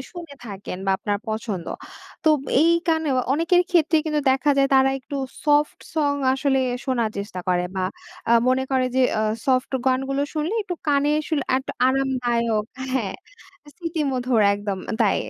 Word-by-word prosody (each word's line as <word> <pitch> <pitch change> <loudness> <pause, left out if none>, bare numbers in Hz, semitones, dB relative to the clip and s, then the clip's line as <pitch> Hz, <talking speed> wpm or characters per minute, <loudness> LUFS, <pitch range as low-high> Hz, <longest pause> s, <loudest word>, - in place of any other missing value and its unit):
শুনে 335 -5 -9
থাকেন 195 -2 -7
বা 195 - +3
আপনার 205 -1 -1
পছন্দ। 215 -5 -3 0.6
তোব 305 -2 +5 0.2
এই 330 +2 +5 0.2
গানেও 320 -5 +1 0.2
অনেকের 335 +4 +3
ক্ষেত্রে 325 -2 +3
কিন্তু 305 -1 0
দেখা 270 +3 +2
যায় 275 0 +3
তারা 265 0 +5
একটু 280 +2 -7 0.3
soft 295 0 +2 0.2
song 290 -2 +1 0.2
আসলে 270 0 +1 0.3
শোনার 235 -5 0
চেষ্টা 200 -2 -5
করে 180 -1 +2
বা 185 - 0 0.5
আ - - +6 0.2
মনে 260 +1 +2
করে 260 -1 +2
যে, - - +4 0.2
আ - - +1 0.2
soft 255 0 +1
গানগুলো 270 +2 +1
শুনলে 315 +8 -1
একটু 360 -3 -4
কানে 285 +1 +3
আসলে 300 -2 -1 0.2
একটু 265 - -6 0.2
আরামদায়ক 240 -5 0 0.3
হ্যাঁ, 225 -8 -1 0.6
স্মৃতিমধুর। 270 -9 -1
একদম 205 -1 -4
আ - - -2
তাই, 200 - +3
265 Hz, 155 wpm, -23 LUFS, 230-300 Hz, 0.6 s, আ